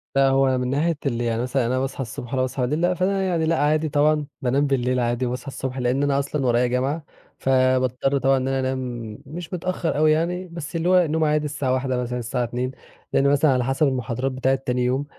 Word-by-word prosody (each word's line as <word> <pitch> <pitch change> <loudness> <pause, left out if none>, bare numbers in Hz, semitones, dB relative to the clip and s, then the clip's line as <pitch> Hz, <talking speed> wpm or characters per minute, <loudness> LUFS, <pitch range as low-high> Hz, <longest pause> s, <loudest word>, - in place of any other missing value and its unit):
لأ 135 0 +5
هو 135 -1 +3
من 125 0 -1
ناحية 155 +3 +1
اللي 120 -3 -1
يعني 115 0 0
مثلًا 125 0 0
أنا 130 +2 0
باصحى 135 0 -3
الصبح 120 0 -6
والّا 130 -1 0
باصحى 130 -1 -1
بالليل، 175 +6 +1
فأنا 190 +2 0
يعني 170 -4 0
لأ 165 0 +1
عادي 155 +1 +2
طبعًا، 150 +1 +2 0.2
بانام 135 +3 +1
بالليل 125 -2 +1
عادي 120 +1 0
وباصحى 125 +3 -4
الصبح؛ 130 0 -5
لأن 130 +2 +1
أنا 140 -1 +2
أصلًا 140 0 -2
ورايا 120 0 +3
جامعة، 135 +6 -1 0.4
فباضطر 130 +1 +2
طبعًا 135 0 +3
إن 130 0 -1
أنا 135 0 0
أنام 125 -4 -3
مش 165 +5 -8
متأخر 175 -3 -2
أوي 155 0 +4
يعني، 175 +4 0
بس 170 -1 -7
اللي 165 +2 0
هو 180 -2 +5
نوم 160 +1 0
عادي 150 0 +1
الساعة 145 -3 -1
01:00 130 -1 0
مثلًا 125 0 -3
الساعة 120 +1 -2
02:00، 125 +2 -2 0.4
لأن 140 - +3
مثلًا 145 +1 +4
على 125 -1 +1
حسب 135 +4 +1
المحاضرات 130 0 -2
بتاعة 130 +1 +1
تاني 125 -2 -1
يوم، 130 +3 0
135 Hz, 215 wpm, -23 LUFS, 125-150 Hz, 0.4 s, لأ